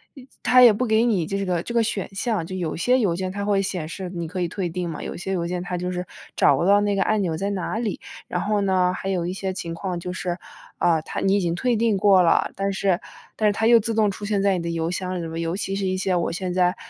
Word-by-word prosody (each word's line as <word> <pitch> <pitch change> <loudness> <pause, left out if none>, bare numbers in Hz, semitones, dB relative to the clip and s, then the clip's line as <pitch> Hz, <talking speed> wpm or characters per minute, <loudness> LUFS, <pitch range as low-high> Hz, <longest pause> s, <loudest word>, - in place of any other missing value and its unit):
呃， 265 - -12 0.2
它 255 0 +6
也 235 -3 +9
不 250 +5 -1
给 220 +1 +3
你 195 -8 +1
这 195 +1 -2
个 180 -3 0
这 - - -6
个 235 - +3
选 210 -3 -2
项。 210 -4 -1
就 185 +3 -6
有 170 -4 -2
些 250 +9 +2
邮 190 -7 +1
件 185 +1 -3
它 200 +1 -4
会 200 -1 +2
显 180 -5 -3
示 185 +2 -6
你 170 -2 -4
可 180 +3 -4
以 175 - +1
退 180 +1 -3
订 175 +1 -3
嘛， 160 - -6
有 - - -5
些 190 +2 -5
邮 170 -2 -1
件 180 0 -3
它 180 0 -3
就 180 +1 -3
是 180 0 -3 0.3
找 - - +4
不 - - 0
到 200 +2 +5
那 205 -1 +1
个 195 - +2
按 215 -1 +1
钮 165 -4 -1
在 200 +3 -2
哪 195 +2 -3
里。 220 -5 -2 0.3
然 180 - -2
后 210 0 0
呢， 185 -2 +2
还 190 - -6
有 180 -3 0
一 180 - -2
些 190 0 -3
情 170 -3 -5
况 180 0 -4
就 180 +1 -5
是， 180 -1 -3 0.4
啊， 165 -2 +3
它 - - -5
你 195 +1 +3
已 - - +3
经 170 -3 0
退 245 +6 +1
订 225 -1 +2
过 195 -1 +5
了， 165 - +3
但 195 0 -1
是 190 -2 +1 0.4
但 215 - +2
是 205 - +3
它 220 +2 -1
又 235 -1 +7
自 225 +1 -2
动 215 -1 +3
出 205 - -7
现 205 -1 0
在 195 -2 +3
你 170 - -4
的 170 - -3
邮 165 0 -1
箱 185 0 -3
里 - - -4
面。 165 0 -5
尤 165 +2 -2
其 195 -1 -3
是 195 -1 -2
一 185 - 0
些 185 0 0
我 170 - 0
现 185 +1 -3
在 180 -1 +2
190 Hz, 315 characters per minute, -23 LUFS, 175-205 Hz, 0.4 s, 也